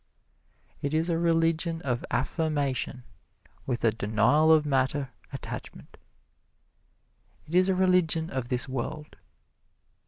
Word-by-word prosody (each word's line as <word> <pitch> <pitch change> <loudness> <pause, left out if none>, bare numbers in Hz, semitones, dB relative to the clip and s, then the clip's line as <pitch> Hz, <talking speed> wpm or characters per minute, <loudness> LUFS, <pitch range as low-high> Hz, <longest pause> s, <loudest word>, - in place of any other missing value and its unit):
It 145 +2 -1
is 165 +2 +1
a 165 - +1
religion 165 0 +1
of 125 -3 -1
affirmation 140 -1 -1 0.6
with 125 -2 -2
a 115 - +4
denial 115 +9 +3
of 155 -1 +5
matter 135 -1 0 0.2
attachment. - - -8 1.5
It 155 - -12
is 185 +1 +4
a 190 - +2
religion 180 -3 +2
of 130 -2 -3
this 125 -1 0
world. 135 +4 -5
150 Hz, 115 wpm, -27 LUFS, 130-165 Hz, 1.5 s, of